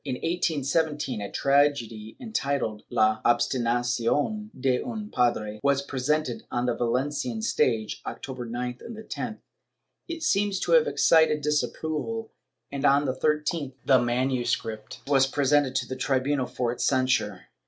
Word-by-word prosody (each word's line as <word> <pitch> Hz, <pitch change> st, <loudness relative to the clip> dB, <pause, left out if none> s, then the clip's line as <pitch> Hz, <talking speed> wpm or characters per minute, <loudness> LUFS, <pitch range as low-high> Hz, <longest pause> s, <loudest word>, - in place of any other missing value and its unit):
In 135 Hz, -3 st, -3 dB
1817 150 Hz, -, -1 dB
a 100 Hz, -, -5 dB
tragedy 135 Hz, -6 st, +1 dB
entitled 140 Hz, -, -2 dB
"La 110 Hz, 0 st, +2 dB
Obsti 120 Hz, +2 st, +2 dB
nacion 120 Hz, -, 0 dB
de 130 Hz, -1 st, +1 dB
un 220 Hz, -3 st, -6 dB
Padre" 110 Hz, -3 st, 0 dB
was 140 Hz, 0 st, +2 dB
presented 140 Hz, 0 st, -1 dB
on 120 Hz, 0 st, -1 dB
the 125 Hz, -, +1 dB
Valencian 145 Hz, -, -1 dB
stage, 115 Hz, -, 0 dB
October 130 Hz, -3 st, -6 dB
9th 125 Hz, +1 st, -4 dB
and 230 Hz, -2 st, -8 dB
10th; 220 Hz, -, -5 dB, 0.7 s
it 335 Hz, -1 st, -5 dB
seems 205 Hz, -7 st, +1 dB
to -, -, -1 dB
have 480 Hz, -1 st, +6 dB
excited 160 Hz, -, +4 dB
disapproval 160 Hz, +8 st, -2 dB, 0.4 s
and, 140 Hz, 0 st, -4 dB
on 140 Hz, +1 st, +4 dB
the 130 Hz, -, 0 dB
13th, 150 Hz, 0 st, -1 dB
the 130 Hz, -2 st, +6 dB
MS. 120 Hz, 0 st, +1 dB, 0.5 s
was 135 Hz, -1 st, +4 dB
presented 140 Hz, -1 st, +2 dB
to 130 Hz, -2 st, +1 dB
the 130 Hz, -, -4 dB
tribunal 130 Hz, 0 st, 0 dB
for 120 Hz, -2 st, -2 dB
its 120 Hz, -, -3 dB
censure. 130 Hz, -7 st, +1 dB
135 Hz, 140 wpm, -26 LUFS, 120-150 Hz, 0.7 s, have